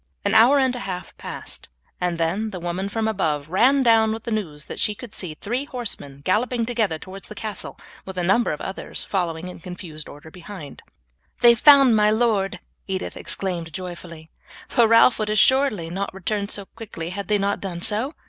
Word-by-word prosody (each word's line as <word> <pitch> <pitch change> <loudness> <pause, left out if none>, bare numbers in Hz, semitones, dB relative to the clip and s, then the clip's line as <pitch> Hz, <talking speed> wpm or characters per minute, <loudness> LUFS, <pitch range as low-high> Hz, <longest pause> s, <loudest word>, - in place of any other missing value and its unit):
An 200 - +2
hour 235 +6 +7
and 260 -2 +2
a - - -4
half 180 -5 -6
passed, - - -7 0.3
and 180 -1 -1
then 180 +7 0
the 190 -4 -6
woman 175 +3 -3
from 220 +1 -1
above 155 -9 -1
ran 260 +9 +4
down 225 -2 +5
with 225 0 -4
the 235 - -4
news 160 -9 -3
that - - -7
she 210 - +1
could 240 0 -10
see 165 -5 -4
three 245 - -2
horsemen 205 - -5
galloping 230 +4 +1
together 225 -8 0
towards 190 +4 -9
the 215 - -9
castle, 215 -2 -5 0.3
with 190 -1 -8
a 180 - 0
number 195 +7 +3
of 150 - -4
others 190 - -4
following 175 -3 -2
in 180 - -9
confused 170 -3 -8
order 145 +2 -12
behind. 180 -3 -10
"Then - - -32 0.5
they 240 - +8
have 235 - +1
found 275 -5 +7
my 210 0 +4
lord," 210 -5 +1 0.3
Edith 190 -1 -3
exclaimed 175 -4 -1
joyfully, 170 -3 -8 0.4
"for 235 -2 +4
Ralph 230 +1 +6
would 215 -1 -1
assuredly 215 -5 +3
not 195 +3 -3
return 200 +2 -2
so 200 -2 0
quickly 195 -7 -8
had 200 0 -5
they 210 - +3
not 200 0 -1
done 175 -3 -4
so. 230 +8 0
200 Hz, 195 wpm, -23 LUFS, 175-225 Hz, 0.5 s, they